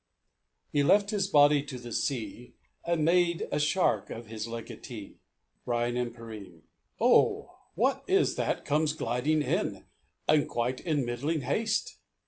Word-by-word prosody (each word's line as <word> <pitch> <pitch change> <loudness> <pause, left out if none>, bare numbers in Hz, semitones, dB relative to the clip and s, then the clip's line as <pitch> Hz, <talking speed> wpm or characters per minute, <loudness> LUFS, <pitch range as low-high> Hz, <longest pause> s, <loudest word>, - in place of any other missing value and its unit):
"He 145 - +2
left 200 +8 +4
his 200 -3 0
body 145 -4 +5
to 140 -2 -7
the 120 -1 -9
sea, 125 0 -3 0.3
And 170 -3 0
made 170 0 +2
a 145 - 0
shark 150 +5 +1
his 115 -1 -6
legatee." 115 -1 -8 0.5
BRYAN 120 0 0
AND 120 -1 -2
PERENNE. 105 -8 -10 0.4
"Oh! - - +3 0.2
what - - +1
is - - +3
that - - -2
comes 150 +1 +1
gliding 150 +3 0
in, - - -2 0.4
And 150 -1 +3
quite 120 +2 -1
in 150 -6 -1
middling 140 +7 -2
haste? 215 - -1
140 Hz, 135 wpm, -29 LUFS, 120-155 Hz, 0.5 s, body